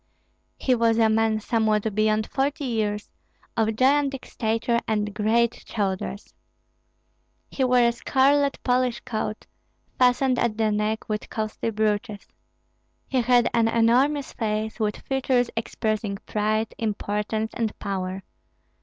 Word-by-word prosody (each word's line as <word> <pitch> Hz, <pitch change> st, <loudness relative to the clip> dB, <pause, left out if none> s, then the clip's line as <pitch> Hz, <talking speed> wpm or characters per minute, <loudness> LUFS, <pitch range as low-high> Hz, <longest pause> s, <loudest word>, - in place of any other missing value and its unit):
He 260 Hz, -, +1 dB
was 230 Hz, -2 st, +2 dB
a 225 Hz, -1 st, +4 dB
man 220 Hz, 0 st, +2 dB
somewhat 220 Hz, -1 st, 0 dB
beyond 215 Hz, +1 st, +2 dB
forty 285 Hz, +4 st, -1 dB
years, 210 Hz, -4 st, -2 dB, 0.4 s
of 225 Hz, -2 st, +2 dB
gigantic 270 Hz, +2 st, +2 dB
stature 230 Hz, +1 st, 0 dB
and 210 Hz, -1 st, -1 dB
great 230 Hz, +3 st, +2 dB
shoulders. 195 Hz, -1 st, -3 dB, 1.2 s
He 270 Hz, -, -1 dB
wore 250 Hz, -1 st, +4 dB
a -, -, +3 dB
scarlet 275 Hz, +4 st, +2 dB
Polish 250 Hz, -1 st, +1 dB
coat, 215 Hz, -1 st, -4 dB, 0.5 s
fastened 250 Hz, 0 st, +3 dB
at 225 Hz, -3 st, 0 dB
the 220 Hz, -1 st, +2 dB
neck 210 Hz, +1 st, -1 dB
with 210 Hz, -1 st, -3 dB
costly 215 Hz, +1 st, -3 dB
brooches. 215 Hz, 0 st, -1 dB, 0.8 s
He 260 Hz, -2 st, +2 dB
had 245 Hz, 0 st, +4 dB
an 230 Hz, -1 st, +3 dB
enormous 250 Hz, +6 st, +2 dB
face, 215 Hz, 0 st, -2 dB
with 210 Hz, -1 st, 0 dB
features 260 Hz, -2 st, 0 dB
expressing 215 Hz, -2 st, -2 dB
pride, 215 Hz, +1 st, -1 dB
importance, 215 Hz, 0 st, -2 dB
and 225 Hz, -3 st, -2 dB
power. 190 Hz, -1 st, -4 dB
225 Hz, 125 wpm, -25 LUFS, 215-245 Hz, 1.2 s, a